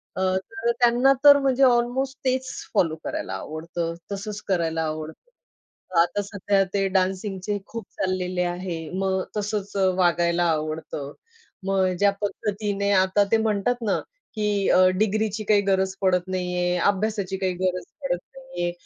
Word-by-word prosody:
अ, 185 - -2 0.2
तर 225 +5 -2
त्यांना 240 +2 +3
अ, - - +7
तर 285 -1 +9
म्हणजे 270 -1 +2
अल्मोस्ट 255 +2 +2
तेच 260 0 0 0.2
फॉलो 165 -6 +2
करायला - - -4
आवडतं, 165 +2 -4 0.2
तसंच 205 +1 -5
करायला 165 -4 0
आवडतं. 155 - -6 0.7
आता 175 +4 0
सध्या 200 0 +1
ते 195 -1 +1
डान्सिंगचे 190 +1 -1
खूप 230 -3 -7
चाललेले 185 -1 -1
आहे, 175 -2 -4
मग 190 -1 +1 0.2
तसंच 205 -1 -3 0.2
वागायला 175 -1 +2
आवडतं. 155 -2 -4 0.6
मग 190 -1 +2
ज्या 200 0 +5
पद्धतीने 205 -1 -1
आता 190 +1 +4
ते 225 - +5
म्हणतात 220 +3 0
ना - - +2 0.4
की 210 -2 0
अ, 185 0 +6
डिग्रीची 215 0 0
काही 205 -1 +5
गरज 190 0 +1
पडत 185 -1 +3
नाहीये, 180 -1 -1
अभ्यासाची 200 -1 -2
काही 185 -1 -1
गरज 180 0 -1 0.2
पडत 175 -11 -1 0.2
नाहीये, 265 -10 -4
195 Hz, 140 wpm, -24 LUFS, 180-215 Hz, 0.7 s, तर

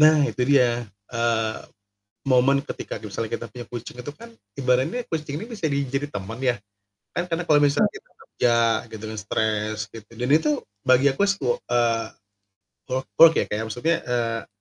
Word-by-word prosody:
Nah 155 -1 +7
itu 135 -3 -1
dia, 120 -4 +3 0.3
eee, 115 -2 +1 0.7
momen 135 +1 +4
ketika 145 - -6
misalnya 110 +1 -4
kita - - -3
punya 120 +2 -9
kucing 120 0 -7
itu 145 - -5
kan, 230 +10 -13 0.3
ibaratnya 130 - +1
kucing 150 -4 -3
ini 215 - -6
bisa 190 - -3
jadi 140 0 -1
teman 105 +2 -6
ya. 125 -2 +3 0.6
Kan 175 - -1
karena 170 0 -1
kalau 150 - +6
misalnya 145 0 +3
kita - - -13
kerja 120 -1 +1 0.4
gitu 110 0 -8
kan 110 - -6
stres 110 +1 -1
gitu 110 -2 -11
dan 125 +3 -3
itu 160 - +4 0.4
bagi 130 +2 +5
aku 135 - -1
sih, 200 0 +1
wo 120 - +1
eee, 115 -2 +1 0.8
work 130 +1 -1
work 165 0 +10
ya - - +3
kayak 105 +1 -2
maksudnya, 160 +9 +1
eee 115 -2 -1
125 Hz, 175 wpm, -24 LUFS, 115-145 Hz, 0.8 s, work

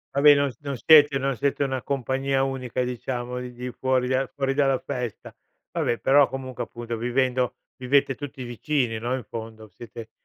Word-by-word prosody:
Va, 140 - +2
beh 145 0 +8
non 140 -1 +1
non 140 -3 -5
siete 145 0 +6
non 135 0 -1
siete 140 +4 0
una 130 -2 -2
compagnia 135 0 0
unica, 130 -2 -2
diciamo, 125 0 -4
di 125 0 -6
di 125 +1 -6
fuori 130 -1 0
del 130 +1 0
fuori 135 -1 0
dalla 135 -2 +2
festa. 125 -4 -6 0.4
Va - - -2
beh, 120 - 0
però, 140 +2 +5
comunque, 130 -2 -6
appunto, 120 0 -6
vivendo 125 +1 0 0.2
vivete 135 +1 +2
tutti 135 -1 -7
vicini, 120 -1 -1
no, 120 +3 -1
in 130 - -5
fondo? 110 0 -8
Siete 115 0 -10
130 Hz, 180 wpm, -25 LUFS, 120-135 Hz, 0.4 s, beh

